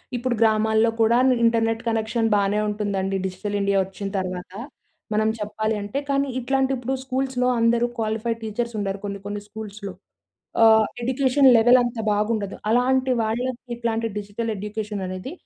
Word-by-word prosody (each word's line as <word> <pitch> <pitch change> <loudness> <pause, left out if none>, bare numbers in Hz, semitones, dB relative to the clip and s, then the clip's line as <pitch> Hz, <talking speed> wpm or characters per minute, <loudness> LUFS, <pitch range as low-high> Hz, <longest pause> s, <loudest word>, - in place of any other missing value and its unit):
ఇప్పుడు 245 0 -1
గ్రామాల్లో 220 0 +3
కూడా 225 +2 +4 0.3
ఇంటర్నెట్ 225 0 +2
కనెక్షన్ 225 +1 0
బానే 200 +1 +1
ఉంటుందండి. 200 -2 -2
డిజిటల్ 190 +2 -4
ఇండియా 200 0 +2
వచ్చిన 195 +1 -7
తర్వాత 185 -1 -4 0.6
మనం 215 +1 +2
చెప్పాలి 215 +1 -2
అంటే. 205 +7 -3
కానీ 275 0 +1
ఇట్లాంటి 265 +2 0
ఇప్పుడు 250 +2 -3
స్కూల్స్‌లో 260 -1 -1
అందరూ 235 +1 +3
క్వాలిఫైడ్ 225 +1 -2
టీచర్స్ 235 +2 -3
ఉండరు 195 -1 -2
కొన్ని 200 0 -4
కొన్ని 205 0 -4
స్కూల్స్‌లో. 210 -2 -8 0.7
ఆహ్, 220 -1 +6 0.2
ఎడ్యుకేషన్ 265 +2 +3
లెవెల్ 240 +3 +6
అంత 240 0 -3 0.2
బాగుండదు. 210 -1 -1
అలాంటి 255 +2 +2
వాళ్ళకి 245 +2 -3
ఇట్లాంటి 230 -1 -1
డిజిటల్ 210 +3 -4
ఎడ్యుకేషన్ 210 0 -4
అనేది 185 +8 -6
220 Hz, 140 wpm, -23 LUFS, 205-240 Hz, 0.7 s, ఆహ్